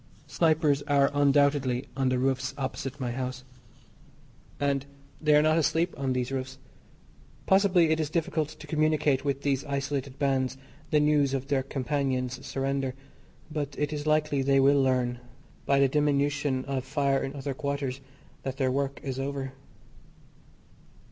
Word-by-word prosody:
Snipers 155 Hz, -3 st, +2 dB
are 140 Hz, -1 st, +3 dB
undoubtedly 140 Hz, -3 st, +2 dB
on 135 Hz, -1 st, +1 dB
the 130 Hz, -, +1 dB
roofs 130 Hz, 0 st, 0 dB
opposite 135 Hz, 0 st, -4 dB
my 125 Hz, -2 st, -2 dB
house, 130 Hz, 0 st, -4 dB, 1.2 s
and 140 Hz, -1 st, 0 dB, 0.3 s
they 150 Hz, -1 st, +4 dB
are 150 Hz, -, +5 dB
not 155 Hz, +1 st, +3 dB
asleep 160 Hz, +3 st, +1 dB
on 135 Hz, -1 st, -2 dB
these 125 Hz, 0 st, -2 dB
roofs. 130 Hz, 0 st, -4 dB, 0.9 s
Possibly 190 Hz, -4 st, +4 dB
it 160 Hz, -, +2 dB
is 155 Hz, -2 st, -1 dB
difficult 160 Hz, -2 st, -1 dB
to -, -, -11 dB
communicate 155 Hz, -3 st, +1 dB
with 140 Hz, -1 st, -2 dB
these 140 Hz, -2 st, +1 dB
isolated 140 Hz, -1 st, -3 dB
bands 135 Hz, -2 st, 0 dB, 0.3 s
the 150 Hz, -, +3 dB
news 150 Hz, -2 st, +3 dB
of 135 Hz, 0 st, -4 dB
their 140 Hz, -2 st, +2 dB
companions' 130 Hz, -2 st, -2 dB
surrender, 135 Hz, -1 st, -2 dB, 0.6 s
but 145 Hz, -2 st, -3 dB
it 150 Hz, +1 st, -1 dB
is 150 Hz, 0 st, -4 dB
likely 155 Hz, -2 st, +2 dB
they 135 Hz, 0 st, +3 dB
will 140 Hz, +1 st, +5 dB
learn, 125 Hz, -2 st, +1 dB, 0.5 s
by 140 Hz, 0 st, +4 dB
the 140 Hz, -, +5 dB
diminution 145 Hz, -1 st, +1 dB
of 135 Hz, -2 st, -2 dB
fire 140 Hz, 0 st, +1 dB
in 135 Hz, +1 st, -5 dB
other 140 Hz, 0 st, -3 dB
quarters 140 Hz, -1 st, -3 dB, 0.4 s
that 135 Hz, 0 st, -5 dB
their 130 Hz, -2 st, +1 dB
work 140 Hz, +1 st, -1 dB
is 135 Hz, -2 st, -4 dB
over. 135 Hz, -1 st, -3 dB
140 Hz, 150 wpm, -28 LUFS, 130-150 Hz, 1.2 s, are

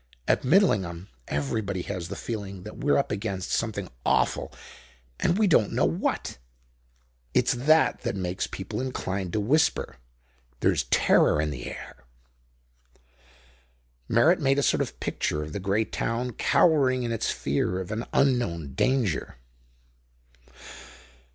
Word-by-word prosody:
At -, -, +3 dB
Midlingham 100 Hz, -, +2 dB, 0.2 s
everybody 90 Hz, +6 st, -2 dB
has 90 Hz, -4 st, -5 dB
the 100 Hz, -, -6 dB
feeling 100 Hz, -4 st, -6 dB
that 105 Hz, -, -9 dB
we're 145 Hz, +1 st, +2 dB
up 140 Hz, -, 0 dB
against 100 Hz, -2 st, -3 dB
something 105 Hz, -4 st, -1 dB, 0.2 s
awful -, -, +1 dB, 0.7 s
and 175 Hz, -, +2 dB
we 215 Hz, -, +3 dB
don't 135 Hz, -, +3 dB
know -, -, +2 dB
what; -, -, -2 dB, 1.0 s
it's -, -, +3 dB
that 155 Hz, +6 st, +3 dB
that -, -, -2 dB
makes 90 Hz, -1 st, -2 dB
people 105 Hz, +4 st, -5 dB
inclined 95 Hz, -8 st, -3 dB
to 110 Hz, -, +1 dB
whisper. 130 Hz, -, +1 dB, 0.6 s
There's -, -, +2 dB
terror 75 Hz, -, +3 dB
in 75 Hz, 0 st, 0 dB
the -, -, -6 dB
air." -, -, -10 dB, 2.0 s
Merritt 155 Hz, +11 st, +4 dB
made 135 Hz, -2 st, +2 dB
a 140 Hz, -, +2 dB
sort -, -, +2 dB
of -, -, -4 dB
picture 75 Hz, -, -2 dB
of 75 Hz, 0 st, -8 dB
the -, -, -3 dB
great 100 Hz, +3 st, 0 dB
town 120 Hz, +2 st, -2 dB
cowering 130 Hz, -2 st, +3 dB
in 120 Hz, -, -2 dB
its 115 Hz, -, -1 dB
fear 70 Hz, +6 st, -1 dB
of 95 Hz, +2 st, -6 dB
an 110 Hz, +2 st, -3 dB
unknown 105 Hz, -, +1 dB
danger. 125 Hz, -, 0 dB
105 Hz, 135 wpm, -26 LUFS, 90-130 Hz, 2.0 s, Merritt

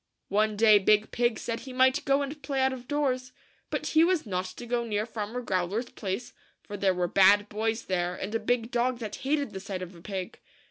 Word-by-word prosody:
One 210 Hz, +1 st, +1 dB
day 215 Hz, -1 st, +7 dB
Big 210 Hz, +2 st, +3 dB
Pig 240 Hz, -1 st, +1 dB
said 230 Hz, -1 st, -3 dB
he 260 Hz, -, -9 dB
might 260 Hz, +1 st, +3 dB
go 275 Hz, +1 st, +3 dB
and 290 Hz, +2 st, -6 dB
play 270 Hz, 0 st, -2 dB
out 265 Hz, 0 st, +2 dB
of 250 Hz, -1 st, -9 dB
doors; 255 Hz, -3 st, -1 dB, 0.4 s
but -, -, -3 dB
he 315 Hz, +1 st, +4 dB
was 345 Hz, -3 st, +2 dB
not 185 Hz, -3 st, -2 dB
to 185 Hz, +6 st, -8 dB
go 240 Hz, 0 st, 0 dB
near 210 Hz, -2 st, -1 dB
Farmer 225 Hz, +1 st, -4 dB
Growler's 195 Hz, +4 st, -1 dB
place, 200 Hz, +4 st, -4 dB, 0.3 s
for 205 Hz, -, -7 dB
there 195 Hz, -2 st, +1 dB
were 180 Hz, -1 st, 0 dB
bad 200 Hz, +3 st, +5 dB
boys 220 Hz, +2 st, -1 dB
there, 180 Hz, -1 st, -1 dB
and 200 Hz, +4 st, -5 dB
a 225 Hz, -, +1 dB
big 235 Hz, +1 st, 0 dB
dog 245 Hz, +1 st, +1 dB
that 215 Hz, -3 st, -6 dB
hated 285 Hz, +1 st, -1 dB
the 190 Hz, -, -6 dB
sight 190 Hz, -2 st, -5 dB
of 180 Hz, +1 st, -9 dB
a 170 Hz, -, -14 dB
pig. 190 Hz, +2 st, -5 dB
225 Hz, 225 wpm, -28 LUFS, 200-255 Hz, 0.4 s, day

